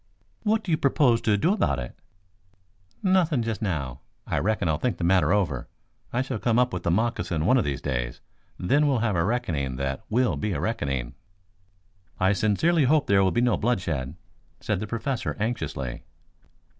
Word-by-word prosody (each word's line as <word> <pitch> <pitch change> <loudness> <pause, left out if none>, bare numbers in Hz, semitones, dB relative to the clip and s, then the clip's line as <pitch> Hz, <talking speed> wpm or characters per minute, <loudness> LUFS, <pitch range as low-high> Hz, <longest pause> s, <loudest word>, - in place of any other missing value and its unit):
"What 215 +1 +1
do 180 - -3
you 155 - +3
propose 130 -4 +3
to 105 -2 +2
do 170 - +2
about 70 - +1
it?" - - -6 1.1
"Nothing 175 - +3
just 115 -1 -3
now. 70 - -2 0.3
I - - -1
reckon 100 -3 0
I'll 80 -1 0
think 125 - -1
the - - -4
matter 90 +1 +3
over. 90 -11 0 0.4
I 125 +2 0
shall 130 -4 -4
come 115 +1 +1
up 125 0 +2
with - - -2
the - - -1
moccasin 85 -5 0
one 130 - +5
of - - +1
these 70 -2 -3
days, - - -2 0.4
then 145 +11 +2
we'll 135 -3 +2
have 105 -4 +1
a 85 - +2
reckoning 85 - -1
that 70 +1 -3
will 120 +3 +1
be 105 -2 -2
a 75 - -2
reckoning." 65 -4 -2 1.1
"I 95 +2 +3
sincerely 135 - +2
hope 150 +2 +3
there 100 -4 +4
will 95 - +3
be 120 - +1
no 120 -3 +2
bloodshed," 85 - -1 0.4
said 110 -4 -1
the 110 - -4
Professor 115 +3 -3
anxiously. 105 - -3
105 Hz, 180 wpm, -26 LUFS, 80-125 Hz, 1.1 s, one